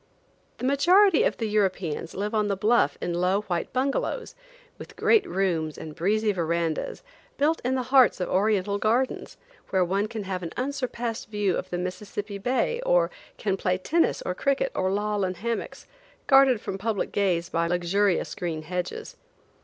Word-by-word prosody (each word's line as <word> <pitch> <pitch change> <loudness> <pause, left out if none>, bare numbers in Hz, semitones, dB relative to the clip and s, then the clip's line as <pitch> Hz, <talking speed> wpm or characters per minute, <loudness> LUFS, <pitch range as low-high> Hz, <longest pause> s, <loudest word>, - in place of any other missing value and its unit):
The - - -4
majority 350 +7 +5
of - - +1
the 225 - -2
Europeans 185 -6 -1
live 205 +3 -3
on 210 -1 +1
the 200 - 0
bluff 210 -8 +2
in 175 - -2
low 180 +3 +1
white 175 -5 -3
bungalows, 275 - -1 0.5
with - - -11
great 445 -3 +4
rooms 165 - -1
and 155 - -8
breezy 210 +6 +1
verandas, 170 - -2 0.3
built 310 +3 +1
in 255 +2 0
the 255 - -1
hearts 255 -8 +6
of 180 - -1
Oriental 200 0 +1
gardens, 240 +5 0 0.3
where 185 -2 +2
one 195 +4 0
can 220 -1 -5
have 185 -1 -4
an 170 -2 -6
unsurpassed 245 -4 -3
view 205 -4 0
of - - -4
the 175 - -2
Mississippi 200 +3 -5
bay, 255 - 0
or - - +3 0.3
can 195 -3 -1
play 185 -1 0
tennis 330 - +1
or 180 - -2
cricket, 275 - 0
or 185 - 0
loll 205 0 0
in 185 0 -1
hammocks, 230 +6 -4 0.4
guarded 270 -4 +5
from 195 - -5
public 215 0 -2
gaze 180 -4 0
by 170 -1 0
luxurious 180 +3 +1
green 165 -3 -4
hedges. 180 +2 -5
205 Hz, 170 wpm, -26 LUFS, 180-245 Hz, 0.5 s, hearts